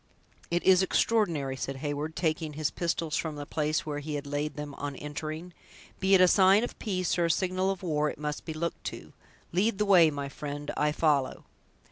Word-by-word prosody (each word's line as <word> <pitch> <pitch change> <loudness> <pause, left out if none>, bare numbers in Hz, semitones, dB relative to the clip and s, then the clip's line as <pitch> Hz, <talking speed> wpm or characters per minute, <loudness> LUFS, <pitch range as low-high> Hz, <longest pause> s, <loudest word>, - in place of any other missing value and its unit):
"It 175 0 0
is 185 -1 +6
extraordinary!" 170 -10 +1
said 135 +1 -4
Heyward, 145 +3 -3
taking 155 -2 -1
his 150 0 -1
pistols 165 -2 -1
from 160 -2 -2
the 145 0 -6
place 155 +1 -1
where 145 -1 -3
he 150 +1 -4
had 145 0 -4
laid 145 +1 -3
them 150 -1 -6
on 145 -1 -4
entering; 155 +4 -6 0.5
"be 195 0 +4
it 185 - +6
a 185 - +8
sign 195 +3 +5
of 245 - -5
peace 185 -4 -1
or 170 - +3
a - - 0
signal 185 +3 +1
of 195 -1 -3
war, 150 -3 +1
it - - -7
must 150 0 -4
be 160 - -5
looked 170 +2 -3
to. - - -7 0.4
Lead 195 +5 +1
the 210 - +1
way, 180 -5 +7
my 140 -2 -4
friend; 145 +1 -5
I 150 0 +2
follow." 150 -4 +1
155 Hz, 205 wpm, -29 LUFS, 145-180 Hz, 0.5 s, a